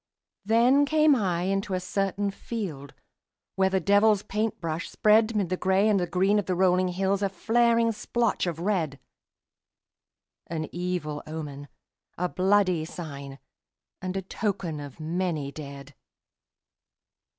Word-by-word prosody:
Then 240 +7 +4
came 305 0 +4
I 180 -7 0
into 195 +1 -1
a - - 0
certain 195 +2 -1
field 180 -11 -6 0.6
Where 190 0 +3
the 190 0 +1
devil's 205 +2 +4
paint 215 +1 -2
brush 165 -1 -3
spread 215 +1 +3
'Mid 200 -5 0
the 185 - -1
gray 190 +3 +2
and 195 -5 +2
green 195 +3 +2
of 205 - -4
the 185 - 0
rolling 185 0 +3
hills 190 +2 0
A 200 - +1
flaring 230 +4 +2
splotch 230 -2 -1
of 170 -3 -2
red, 170 -7 -1 1.5
An 155 -1 -3
evil 175 -4 -3
omen, 145 -3 -6 0.5
a 180 - 0
bloody 185 -2 +2
sign, 140 -5 -8 0.6
And 185 +1 -3
a 190 - -3
token 185 -5 -3
of 145 0 -9
many 160 -3 -2
dead. 140 -1 -9
185 Hz, 135 wpm, -27 LUFS, 165-205 Hz, 1.5 s, Then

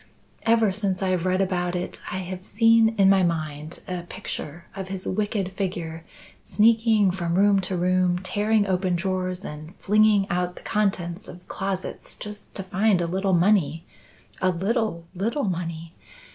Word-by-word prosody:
Ever 225 -3 +4
since 195 -1 -1
I've 185 -1 0
read 185 +1 +2
about 180 -2 0
it 180 0 -4
I - - -2
have 185 0 -6
seen, 225 +2 +4
in 195 -1 +5
my 195 0 +5
mind, 155 -2 -2
a 180 -1 -3
picture 170 -3 -7
of 190 -1 -5
his 190 -1 -4
wicked 205 -1 -1
figure 175 -4 -4 0.4
sneaking 220 -2 +4
from 170 -2 -2
room 200 +1 +4
to 185 -1 -2
room, 180 0 +2
tearing 205 +3 +1
open 185 -1 0
drawers 185 0 -2
and 155 +4 -8
flinging 210 -1 +3
out 180 0 -1
the - - -12
contents 190 -2 -1
of 180 +1 -12
closets 195 -1 -4
just 210 -1 -9
to 195 - -3
find 195 +1 +2
a 170 - 0
little 190 +3 0
money 170 -3 +2 0.6
a 185 - +3
little, 195 -1 -1
little 225 +10 -1
money! 170 -3 -3
185 Hz, 160 wpm, -25 LUFS, 175-205 Hz, 0.6 s, in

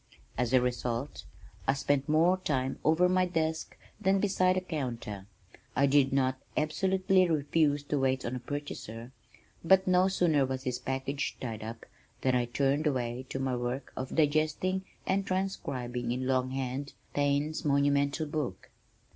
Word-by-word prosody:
As 120 0 0
a 130 - +6
result, 125 +2 -2 0.4
I 135 - +4
spent 140 0 0
more 165 +4 +4
time 135 -6 -1
over 160 +3 +4
my 185 0 +2
desk 160 -2 -2 0.2
than 195 -1 +3
beside 185 -2 +2
the 185 - 0
counter. 120 - -5 0.5
I 140 - +4
did 140 -1 +4
not 130 -1 +1 0.2
absolutely 185 +3 +2
refuse 145 -1 +2
to 145 0 -1
wait 130 -1 +1
on 120 - -2
a - - -3
purchaser 120 -4 -6 0.5
but 190 +3 +5
no 185 0 +4
sooner 170 -7 +3
was 130 0 -3
his 125 -2 -2
package 135 +2 -3
tied 110 -4 -5
up 115 +1 -7 0.4
than 130 - +2
I 125 -1 +2
turned 140 +5 +1
away 125 -2 -2
to - - -3
my 135 -1 -1
work 125 +2 -3
of 130 0 -5
digesting 155 +5 +1 0.2
and 195 +1 +1
transcribing 125 -11 -2
in 125 +1 -2
long 130 -1 +1
hand 135 +1 -3 0.2
Taine's 145 +2 0
monumental 140 +1 +2
book. 145 -10 -4
140 Hz, 155 wpm, -30 LUFS, 130-160 Hz, 0.5 s, a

